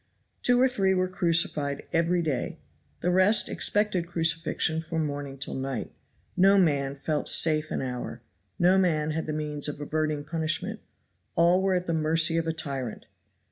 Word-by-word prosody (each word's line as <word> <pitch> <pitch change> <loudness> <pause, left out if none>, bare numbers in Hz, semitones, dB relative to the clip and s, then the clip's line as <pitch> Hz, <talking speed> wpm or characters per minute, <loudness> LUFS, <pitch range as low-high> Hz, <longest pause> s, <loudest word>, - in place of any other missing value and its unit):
Two 245 0 +3
or 260 - +5
three 195 -7 +1
were 185 0 +1
crucified 165 -5 0
every 170 +1 +1
day; 140 -6 -3 0.4
the 180 - +1
rest 190 +4 +4
expected 205 -5 0
crucifixion 165 -1 0
from 160 -1 -3
morning 145 -1 -5
till 135 - -4
night. 135 0 -4 0.4
No 195 +2 +5
man 140 -6 +1
felt 150 +2 0
safe 155 -1 +4
an - - -3
hour; 125 -1 -6 0.3
no 185 +2 +4
man 155 -4 +1
had 160 +1 -3
the - - -2
means 150 -1 -2
of 150 0 -6
averting 155 0 -2
punishment; 160 +1 -2 0.6
all 170 +2 +4
were 190 -1 +1
at 180 0 -1
the 170 - -2
mercy 160 +1 +3
of 165 0 -1
a - - +1
tyrant. 140 -7 -5
160 Hz, 165 wpm, -26 LUFS, 150-180 Hz, 0.6 s, or